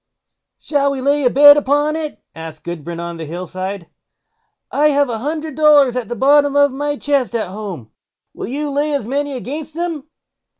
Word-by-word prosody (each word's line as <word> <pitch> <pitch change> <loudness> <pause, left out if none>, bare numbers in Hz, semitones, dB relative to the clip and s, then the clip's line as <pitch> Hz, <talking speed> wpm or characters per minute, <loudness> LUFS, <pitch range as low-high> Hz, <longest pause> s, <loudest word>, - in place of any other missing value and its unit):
"Shall 280 -2 0
we 275 -1 -3
lay 280 +1 +1
a - - +5
bet 290 +3 +8
upon 290 +2 +1
it?" 310 -2 -5
asked 160 -1 -9
Gudbrand 170 0 -6
on 170 0 -5
the 165 - -6
Hill 175 +4 -6
side. 185 +1 -6 0.9
"I 295 +2 +3
have 285 -2 +2
a 225 - -3
hundred 310 +4 -4
dollars 290 -4 +4
at 245 -4 -3
the 240 - -3
bottom 285 +3 +3
of 285 -1 +4
my 290 +2 -3
chest 275 -5 -1
at 215 -5 -2
home; 190 - -7 0.4
will - - -6
you 290 +4 -3
lay 290 +2 0
as 275 - -3
many 285 +3 -2
against 290 +5 -6
them?" 325 -4 -4
280 Hz, 185 wpm, -18 LUFS, 210-290 Hz, 0.9 s, bet